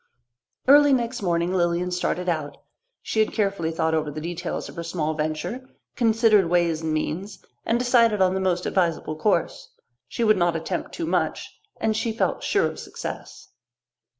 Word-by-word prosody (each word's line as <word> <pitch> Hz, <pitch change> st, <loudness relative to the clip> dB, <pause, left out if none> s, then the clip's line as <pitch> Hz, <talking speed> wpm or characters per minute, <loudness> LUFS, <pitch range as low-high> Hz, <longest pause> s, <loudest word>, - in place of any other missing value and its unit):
Early 290 Hz, +1 st, +7 dB
next 240 Hz, -1 st, -1 dB
morning 175 Hz, -1 st, 0 dB
Lilian 175 Hz, 0 st, 0 dB
started 180 Hz, 0 st, -1 dB
out. 155 Hz, -4 st, -2 dB, 0.5 s
She 220 Hz, -, -2 dB
had 215 Hz, -, +3 dB
carefully 195 Hz, -6 st, 0 dB
thought 160 Hz, 0 st, 0 dB
over 155 Hz, -1 st, 0 dB
the 150 Hz, +1 st, -6 dB
details 170 Hz, +2 st, -4 dB
of -, -, -11 dB
her 170 Hz, -, -5 dB
small 165 Hz, -2 st, -2 dB
venture, 155 Hz, +12 st, -4 dB, 0.3 s
considered 220 Hz, -5 st, +3 dB
ways 170 Hz, -2 st, +1 dB
and 160 Hz, -1 st, -2 dB
means, 175 Hz, +6 st, -3 dB, 0.2 s
and 230 Hz, -, +2 dB
decided 235 Hz, -3 st, +3 dB
on 185 Hz, -1 st, +3 dB
the 190 Hz, -, -1 dB
most 180 Hz, -2 st, 0 dB
advisable 165 Hz, -4 st, 0 dB
course. 170 Hz, +1 st, -1 dB, 0.4 s
She 235 Hz, -, -3 dB
would 215 Hz, -2 st, +4 dB
not 175 Hz, -2 st, +2 dB
attempt 165 Hz, +2 st, -3 dB
too 335 Hz, -, -3 dB
much, -, -, -2 dB, 0.2 s
and 220 Hz, -1 st, 0 dB
she 225 Hz, +1 st, -1 dB
felt -, -, -1 dB
sure -, -, +1 dB
of -, -, -4 dB
success. -, -, -8 dB
180 Hz, 170 wpm, -24 LUFS, 165-220 Hz, 0.5 s, Early